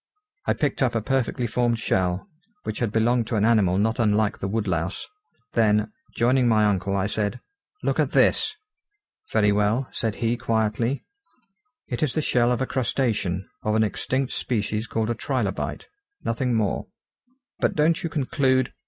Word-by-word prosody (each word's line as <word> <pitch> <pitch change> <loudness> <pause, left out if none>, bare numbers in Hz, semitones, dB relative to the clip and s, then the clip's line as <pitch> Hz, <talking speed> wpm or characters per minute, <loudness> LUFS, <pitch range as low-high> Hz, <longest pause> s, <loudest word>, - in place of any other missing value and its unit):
I - - +4
picked 145 -1 -1
up 125 -3 +2
a 115 - +1
perfectly 130 -1 0
formed 120 +1 +1
shell, 95 - 0 0.4
which 110 - -4
had 115 -4 0
belonged 115 +1 +2
to 115 - -2
an 105 0 +2
animal 105 -6 +3
not 110 +4 +1
unlike 110 -2 +2
the 95 - -2
woodlouse: 95 -4 -1 0.5
then, 105 - +3 0.2
joining 125 +1 +3
my 110 -2 +4
uncle, 100 -1 +1
I 95 -1 +1
said: 105 +3 -1 0.4
"Look - - 0
at - - +3
this!" 435 -1 +3 0.8
"Very 105 -1 +3
well," 105 +6 +1
said 110 -2 -1
he 120 0 0
quietly, 115 +2 0 0.8
"it 120 - -4
is 150 -5 0
the 155 - +2
shell 120 -3 +2
of 125 +1 +1
a - - 0
crustacean, 115 -8 -1
of 105 0 0
an 110 - +4
extinct 130 +5 -1
species 110 -1 -1
called 110 +1 -1
a - - +2
trilobite. 115 -5 -2 0.4
Nothing 120 +1 0
more." 105 -4 0 0.7
"But - - +1
don't 160 +4 +3
you 170 - -2
conclude 130 -3 +1
115 Hz, 160 wpm, -24 LUFS, 105-125 Hz, 0.8 s, I